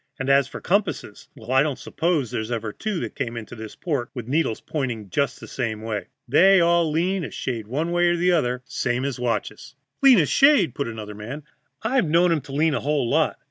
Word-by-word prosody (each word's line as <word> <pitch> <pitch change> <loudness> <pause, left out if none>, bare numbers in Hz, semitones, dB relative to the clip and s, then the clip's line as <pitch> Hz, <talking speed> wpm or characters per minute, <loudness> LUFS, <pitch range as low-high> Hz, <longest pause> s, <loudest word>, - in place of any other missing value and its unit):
And 135 +1 0
as 135 -1 +4
for - - -8
compasses 195 - -2
well, 115 +3 -9
I 130 +1 +5
don't 145 -2 -1
suppose 160 -8 -1
there's 110 +1 -3
ever 115 -3 -3
two 215 -5 -3
that - - -5
came 120 -2 -4
into 115 +1 -8
this 110 -1 -9
port 140 -9 -2
with 120 -3 -6
needles 140 -4 0
pointing 120 - -4
just 140 -1 0
the - - -10
same 110 -4 -3
way. 110 -2 -4 0.2
They 190 +9 +6
all 170 -1 +3
lean 175 +4 0
a - - -4
shade 115 -5 -4
one 155 +8 -2
way 175 0 +3
or 175 - +3
the 180 +1 +2
other, 125 -7 0
same 125 +1 -2
as 140 -3 -3
watches." 125 +2 -3 0.3
"Lean 270 -3 +7
a 160 - +4
shade!" 275 - +4
put 140 - -3
in 115 - -5
another 105 -1 -7
man. 120 +9 -7 0.4
"I've 245 -4 +1
known 170 +2 +4
'em 160 -3 +1
to 135 - -12
lean 155 +3 +2
a - - 0
whole 145 -3 0
lot. - - +2
140 Hz, 225 wpm, -23 LUFS, 120-170 Hz, 0.4 s, Lean